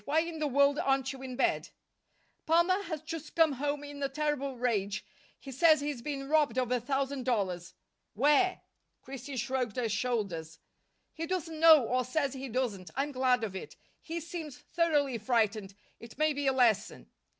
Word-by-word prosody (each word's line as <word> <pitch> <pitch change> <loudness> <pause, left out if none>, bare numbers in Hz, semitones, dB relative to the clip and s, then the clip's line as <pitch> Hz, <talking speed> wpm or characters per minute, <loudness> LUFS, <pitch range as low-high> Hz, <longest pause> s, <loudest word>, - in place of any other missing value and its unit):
Why 310 +3 +2
in 335 -1 -5
the 305 - 0
world 280 +2 +3
aren't 270 -3 +1
you 265 - -10
in 260 -1 -6
bed?" 270 - 0 0.8
"Palmer 345 +4 +3
has 315 -3 -5
just 320 -1 -7
come 325 -2 +5
home 285 +2 -2
in 290 0 -8
a 275 - 0
terrible 280 -2 -2
rage. 205 -5 -1 0.3
He 275 - -9
says 310 +3 +5
he's 285 -4 -3
been 275 0 -4
robbed 295 -5 +2
of 250 -1 0
a 250 - +2
thousand 270 +2 -2
dollars." 195 -8 -2 0.4
"Where?" 295 - +3 0.4
Christine 270 0 -7
shrugged 255 -3 -2
her 245 -2 0
shoulders. 200 -8 -2 0.6
"He 330 +1 -5
doesn't 330 -3 -3
know, 320 -4 +8
or 255 +2 +1
says 275 +2 -1
he 265 0 -6
doesn't. 220 -7 -2
I'm 280 +2 -1
glad 255 -2 +2
of 200 -4 -4
it. 190 - -7 0.3
He 330 +1 -5
seems 325 -4 -7
thoroughly 295 -7 0
frightened. 215 -3 0 0.2
It 230 +1 -12
may 310 0 +2
be 285 -1 -2
a - - +5
lesson." 230 -5 +1
270 Hz, 175 wpm, -30 LUFS, 245-300 Hz, 0.8 s, know